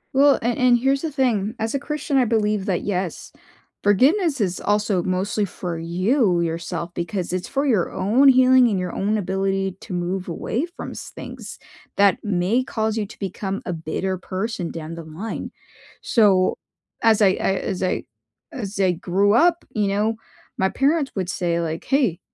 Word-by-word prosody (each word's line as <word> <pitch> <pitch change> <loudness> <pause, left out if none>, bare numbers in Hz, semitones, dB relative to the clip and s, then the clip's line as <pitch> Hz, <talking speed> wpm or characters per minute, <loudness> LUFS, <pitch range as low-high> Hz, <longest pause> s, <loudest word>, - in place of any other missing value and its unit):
Well, 280 0 +6
and 240 0 0
and 250 -1 +5
here's 270 +3 +1
the 320 -2 -3
thing. 235 -5 0
As 225 +3 -2
a 275 - 0
Christian, 295 -1 -2
I 255 - +4
believe 210 -3 +1
that, 180 -3 0
yes, 185 -3 -3 0.5
forgiveness 280 - +3
is 185 -4 -1
also 205 -2 +1
mostly 190 +4 -1
for 175 -3 -4
you, 185 - +1
yourself, 170 +1 -3
because 175 +1 -3
it's 185 -1 -2
for 275 +1 -1
your 220 -11 +1
own 240 +9 +3
healing 255 -1 +6
and 205 - 0
your 180 -1 -3
own 210 +2 0
ability 195 0 -1
to 190 - -8
move 180 +2 -2
away 245 - -2
from - - -6
s - - -8
things - - -8 0.4
that 200 -1 +4
may 205 +5 +1
cause 220 -3 -2
you 215 -2 -2
to - - -13
become 195 0 -4
a 180 - -2
bitter 175 +4 -3
person 185 -1 -3
down 165 0 -7
the 165 -1 -7
line. 165 +8 -6 0.5
So, 195 -5 +3 0.4
as 225 -2 +4
I 195 - +6
I, 190 +1 0
as 185 - -3
I 185 - 0 0.5
as 205 -5 -6
I 185 -2 +4
grew 190 +4 +1
up, 335 +7 +3
you 210 -2 +1
know, 210 +3 +1 0.5
my 190 - +3
parents 280 +3 +1
would 190 -3 -2
say 170 -2 -1
like, 165 -1 -3
"Hey, 250 - +1
200 Hz, 175 wpm, -22 LUFS, 180-240 Hz, 0.5 s, Well